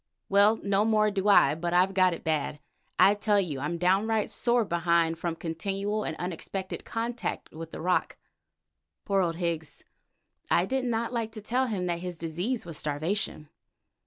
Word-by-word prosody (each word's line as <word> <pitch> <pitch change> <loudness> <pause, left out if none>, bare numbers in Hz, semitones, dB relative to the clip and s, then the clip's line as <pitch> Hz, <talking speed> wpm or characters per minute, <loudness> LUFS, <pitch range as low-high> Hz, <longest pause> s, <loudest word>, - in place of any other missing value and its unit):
Well, 205 +3 +5
no 200 0 +2
more 215 -1 +3
do 200 0 -1
I, 170 -8 +6
but 170 +2 -2
I've 185 +2 +4
got 185 -2 +3
it - - -12
bad. 150 -2 -1 0.4
I 200 - +6
tell 205 0 +2
you 160 -8 -2
I'm 150 +5 -2
downright 200 +5 +1
sore 240 -1 +1
behind 170 -2 +1
from 170 -1 -2
continual 195 +6 -3
and 160 - -4
unexpected 185 +2 -5
contact 235 0 -4
with 160 +1 -8
the - - -8
rock." 180 +2 0 0.9
Poor 195 -2 +2
old 170 -2 0
Higgs! 165 -3 -4 0.7
I 175 - +3
did 260 +4 -1
not 235 0 -1
like 230 -2 -2
to 215 - -8
tell 250 +5 0
him 200 -6 -2
that 170 -1 -1
his 180 -1 -6
disease 175 +10 -3
was 165 -3 -1
starvation. 155 +1 -1
185 Hz, 170 wpm, -28 LUFS, 165-215 Hz, 0.9 s, I